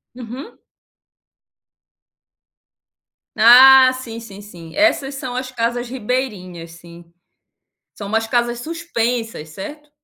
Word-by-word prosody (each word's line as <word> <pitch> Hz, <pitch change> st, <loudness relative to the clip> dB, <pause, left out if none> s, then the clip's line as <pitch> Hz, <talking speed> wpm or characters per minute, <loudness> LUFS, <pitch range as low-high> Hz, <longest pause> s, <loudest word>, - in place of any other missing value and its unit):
Uhum. 255 Hz, -, -9 dB, 2.8 s
Ah 260 Hz, +3 st, +8 dB
sim, 240 Hz, -3 st, -8 dB
sim, 205 Hz, -3 st, -12 dB
sim, 170 Hz, -6 st, -13 dB
essas 285 Hz, -4 st, +1 dB
são 255 Hz, -2 st, -6 dB
as 255 Hz, 0 st, -4 dB
casas 240 Hz, 0 st, -3 dB
ribeirinhas, 210 Hz, -9 st, -5 dB
sim. 170 Hz, 0 st, -15 dB, 0.8 s
São 200 Hz, -, -8 dB
umas 225 Hz, +1 st, -1 dB
casas 240 Hz, 0 st, -1 dB
suspensas, 240 Hz, -, -4 dB
certo? 295 Hz, -, -10 dB
240 Hz, 95 wpm, -19 LUFS, 205-260 Hz, 2.8 s, Ah